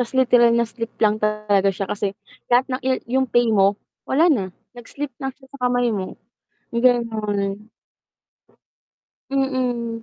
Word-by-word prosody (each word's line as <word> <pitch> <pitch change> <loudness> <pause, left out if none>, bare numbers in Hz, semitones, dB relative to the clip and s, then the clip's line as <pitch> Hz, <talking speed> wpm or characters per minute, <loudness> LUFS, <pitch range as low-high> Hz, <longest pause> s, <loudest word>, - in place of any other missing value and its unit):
ta’s 245 0 -2
literal 245 -2 +5
na 235 - +3
slip 230 0 -6
lang 215 0 +3
talaga 210 -2 +1
siya 195 +1 -3
kasi 200 -1 -2 0.3
lahat 245 +1 +4
ng 255 - -2
yu 260 - +2 0.3
yung 260 - 0
pay 240 0 +3
mo, 200 -1 +4 0.3
wala 320 +6 +4
na, 195 -7 -1 0.3
nag-slip 275 +3 -6
lang 270 - -2
siya 265 -1 -20
sa 250 -3 -1
kamay 245 -1 +1
mo 190 -3 -4 0.6
gano'n. 215 -5 0 1.7
Mm. 250 -4 -1
235 Hz, 145 wpm, -22 LUFS, 210-255 Hz, 1.7 s, literal